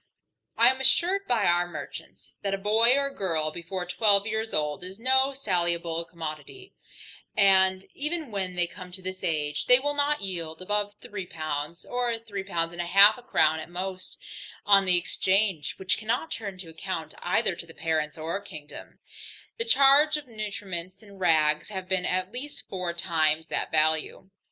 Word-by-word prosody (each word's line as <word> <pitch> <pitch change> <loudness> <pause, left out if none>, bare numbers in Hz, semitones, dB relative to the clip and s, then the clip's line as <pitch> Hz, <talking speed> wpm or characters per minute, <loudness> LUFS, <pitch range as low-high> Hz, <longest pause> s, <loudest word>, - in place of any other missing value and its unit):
I 235 +2 +7
am 260 0 -5
assured 360 +9 +2
by 235 -4 +2
our 175 0 +2
merchants, 175 - -9
that 195 -1 -1
a - - -6
boy 220 +5 +4
or 280 0 0
a - - -14
girl, 160 -5 -1
before 175 +3 -5
twelve 200 +2 +3
years 220 +1 -2
old, 150 +2 -1
is 190 +3 -9
no 265 +3 +3
saleable 170 -8 -1
commodity, 165 - -8 0.6
and 190 -1 +4
even 300 -2 -3
when 190 -3 -3
they 175 0 +1
come 180 +1 -10
to 190 - -8
this 185 0 -6
age, 150 -3 -2
they 250 - +8
will 290 +3 -1
not 290 -1 0
yield 170 -4 -4
above 205 +2 -1
three 200 -3 -6
pounds, 155 +1 -5
or 245 -2 -1
three 210 -4 -6
pounds 170 -3 -2
and 175 - -4
half 195 +6 +6
a - - -13
crown 160 -10 +2
at 160 - -8
most, 185 +1 -6 0.5
on 200 -1 +6
the 180 -1 +3
exchange; 190 -3 0
which 190 0 -1
cannot 230 +8 -2
turn 200 -4 -5
to 180 -3 -7
account 165 0 -5
either 175 0 +1
to 170 - -9
the 165 - -13
parents 155 -1 -1
or 165 +5 -3
kingdom, 150 -6 -11 0.6
the 460 - +1
charge 295 -4 +5
of 300 - -8
nutriments 200 -4 -6
and 200 -2 -15
rags 155 -3 +2
having 190 -3 -6
been 185 -1 +1
at 185 +1 -1
least 270 +5 -7
four 180 -2 -3
times 160 -2 +1
that - - -2
value. 155 +4 0
190 Hz, 175 wpm, -27 LUFS, 170-220 Hz, 0.6 s, they